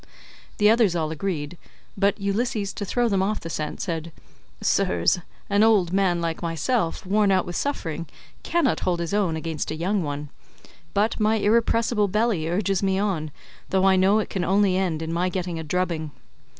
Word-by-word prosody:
The 210 - +4
others 220 -5 +4
all 155 -2 -1
agreed, 160 -1 -4 0.4
but 200 +1 +1
Ulysses, 200 0 -1
to 205 - -4
throw 240 +5 +1
them 195 -4 +1
off 210 +2 0
the 165 - -7
scent, 155 -1 -4
said, 165 -2 -3 0.5
"Sirs, 90 - +2 0.3
an 200 +1 +2
old 205 -6 +4
man 190 -3 +2
like 165 -1 -3
myself, 170 - -1
worn 205 +2 +2
out 190 -2 +3
with 175 - -6
suffering, 170 - -3 0.3
cannot 340 -8 +1
hold 175 -2 -1
his 170 +2 -3
own 195 -6 +1
against 160 -1 -4
a 155 - -3
young 185 +5 0
one; 145 -1 -4 0.7
but 210 +3 +1
my 215 +1 +3
irrepressible 225 0 +2
belly 205 -5 0
urges 195 +1 0
me 190 -1 +1
on, 190 -7 -1 0.4
though 190 0 +2
I 190 -1 +5
know 190 +3 +4
it 220 - -2
can 185 - -1
only 195 0 +3
end 175 -4 -1
in 160 +1 -3
my 180 +2 +1
getting 180 -2 -3
a - - -4
drubbing. 165 -1 -1
190 Hz, 180 wpm, -24 LUFS, 165-210 Hz, 0.7 s, I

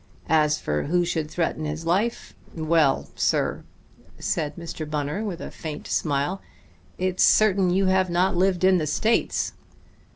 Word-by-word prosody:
As 150 -1 +3
for 75 0 -2
who 175 +3 +1
should 160 -3 -2
threaten 160 -1 -2
his 155 +2 -4
life 200 +8 -1 0.2
well, 155 -3 +2
sir," - - 0 0.5
said 150 -3 -2
Mr. 165 -3 -6
Bunner 150 +6 -2
with 190 -6 -4
a - - -7
faint 155 -3 -7
smile, 145 +5 -1 0.6
"it's 185 0 -1
certain 200 -4 +4
you 190 +2 +2
have 185 0 +2
not 180 +2 +1
lived 185 0 +1
in 185 -1 +5
the 155 - -2
States. 220 +10 0
170 Hz, 150 wpm, -24 LUFS, 155-185 Hz, 0.6 s, in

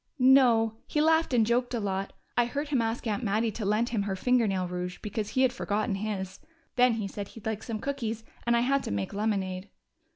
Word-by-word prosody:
"No. 245 -4 +5
He 300 - -1
laughed 320 +1 +3
and 235 -3 +4
joked 245 +2 +1
a - - 0
lot. 195 -1 -2 0.2
I 240 - +4
heard 285 +5 -3
him 270 -5 +2
ask 225 +2 -2
Aunt 220 +2 -1
Mattie 220 +2 +1
to 215 - -6
lend 210 +4 +1
him 225 -4 0
her 200 -1 -2
finger 245 +3 +2
nail 185 -2 -1
rouge 180 0 -4
because 210 0 -3
he 260 - +2
had 255 -1 +3
forgotten 210 -1 -1
his. 195 -2 -4 0.4
Then 250 -1 +5
he 215 -3 -2
said 200 0 -6
he'd 225 - -13
like 220 -1 -2
some 225 -2 -4
cookies, 230 -4 -3 0.2
and 235 0 +4
I - - +3
had 275 +3 +2
to - - -3
make 100 -1 -2
lemonade." 195 -2 -2
225 Hz, 225 wpm, -28 LUFS, 200-245 Hz, 0.4 s, No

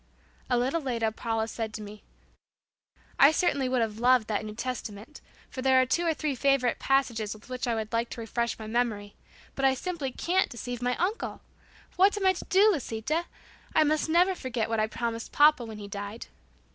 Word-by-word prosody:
A 245 - +3
little 265 +7 0
later, 230 -5 -1
Paula 225 0 -2
said 225 -1 -5
to 215 - -6
me, 210 0 -10 1.2
"I 275 +2 +8
certainly 285 -6 +1
would 255 -1 +1
have 220 -1 -4
loved 245 -2 +4
that 210 -1 -1
New 215 0 -7
Testament, 230 +1 -6 0.3
for 260 - -7
there 260 0 +4
are 255 - +4
two 340 +7 0
or 325 - +3
three 300 -1 -1
favorite 265 -2 +1
passages 235 -6 0
with 215 +3 -16
which 255 0 -3
I 235 - +1
would 220 0 -4
like 230 +1 0
to - - -7
refresh 235 +1 -2
my 220 - -8
memory, 215 -3 -1 0.4
but 270 - -5
I 265 -1 +4
simply 310 -2 -4
can't 365 +8 +1
deceive 245 0 -6
my 250 0 0
uncle. 390 +6 -2 0.5
But - - -28
what 400 +2 +5
am 405 - -2
I 375 - +5
going - - -14
to - - -7
do, 405 +3 +5
Lisita? 300 - -2 0.5
I 310 - +6
must 310 +1 +1
never 355 +4 +4
forget 245 -9 -3
what 225 -1 0
I 215 - +2
promised 230 +1 -4
papa 295 -3 +5
when 220 -1 -8
he 205 -1 -8
died." 205 +2 -6
245 Hz, 210 wpm, -28 LUFS, 225-290 Hz, 1.2 s, I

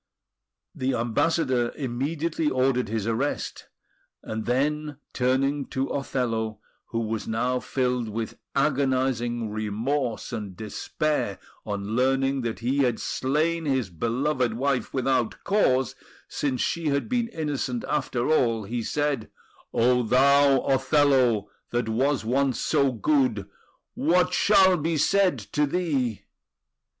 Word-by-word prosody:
The 130 0 -1
Ambassador 125 +1 +1
immediately 150 +5 -1
ordered 130 -3 +1
his 110 -2 -2
arrest; 115 +6 -2 0.6
and 110 0 -5
then, 150 +3 0 0.2
turning 135 +3 +1
to 135 +1 -2
Othello, 115 -5 -2 0.3
who 115 - -2
was 110 -1 -3
now 125 +3 0
filled 125 -3 -1
with 110 +1 -5 0.2
agonising 130 -5 0
remorse 115 +4 -2
and 105 -5 -5
despair 110 +1 -2 0.3
on 100 +1 -3
learning 135 +1 +2
that 115 -1 -4
he 130 +4 0
had 125 -4 +2
slain 155 +5 0
his 130 -8 0
beloved 120 - 0
wife 135 +1 -1
without 130 -3 0
cause, 135 - +2 0.3
since 130 -3 -2
she 170 -2 -1
had 140 -1 0
been 245 -2 0
innocent 145 - -3
after 130 -5 -1
all, 115 -8 +2
he 115 +4 -3
said: 145 -1 -1 0.4
"O 125 +1 +3
thou 135 +3 +4
Othello, 135 -4 +3 0.2
that 120 -1 -1
was 130 +3 +1
once 130 +1 +1
so 140 -3 +2
good, 125 -4 +1 0.5
What 180 +4 +2
shall 190 -3 +5
be 160 +1 -1
said 185 +1 +3 0.2
to 150 0 +2
thee?" 140 - -1
130 Hz, 120 wpm, -25 LUFS, 115-145 Hz, 0.6 s, shall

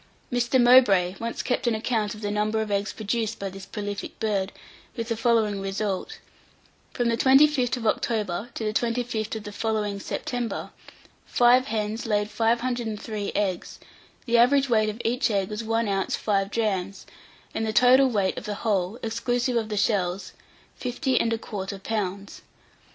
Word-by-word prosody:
Mr. 245 +1 +2
Mowbray 240 -8 +6
once 230 0 -3
kept 250 - -1
an 235 - +2
account 220 -2 -1
of 210 - -11
the 205 -1 -2
number 210 +1 0
of 215 -1 -2
eggs 200 +1 0
produced 225 +1 -2
by 195 - -4
this 190 -1 -10
prolific 205 -1 -5
bird, 200 -3 0 0.4
with 230 -2 -4
the 230 - 0
following 220 -3 +1
result: 195 0 -3 0.7
From 245 -2 -1
the 230 0 +1
25th 265 -1 +4
of 235 - -6
October 215 -2 -1
to - - -4
the 215 0 -1
25th 230 -2 -1
of 220 - -5
the 205 - -7
following 210 -2 -2
September 240 +3 -4 0.6
five 245 +1 +4
hens 215 +1 -2
laid 210 -1 0
503 225 -3 -1
eggs; 190 -4 -2 0.5
the 235 -1 +3
average 270 +3 +4
weight 215 -2 +3
of 215 +2 -6
each 245 +2 +1
egg 195 -3 0
was 210 +2 -4
one 225 0 0
ounce 195 -1 0
five 195 -2 0
drachms, 195 -4 -2 0.5
and 225 - -2
the 220 - 0
total 255 +4 +6
weight 200 -5 0
of - - -12
the 210 -1 -3
whole, 200 -1 0
exclusive 240 +2 -1
of 225 -2 0
the 210 - -3
shells, 190 -3 0 0.4
50 260 +2 0
1/4 205 -4 -3
pounds. 200 -2 -3
220 Hz, 160 wpm, -25 LUFS, 205-235 Hz, 0.7 s, Mowbray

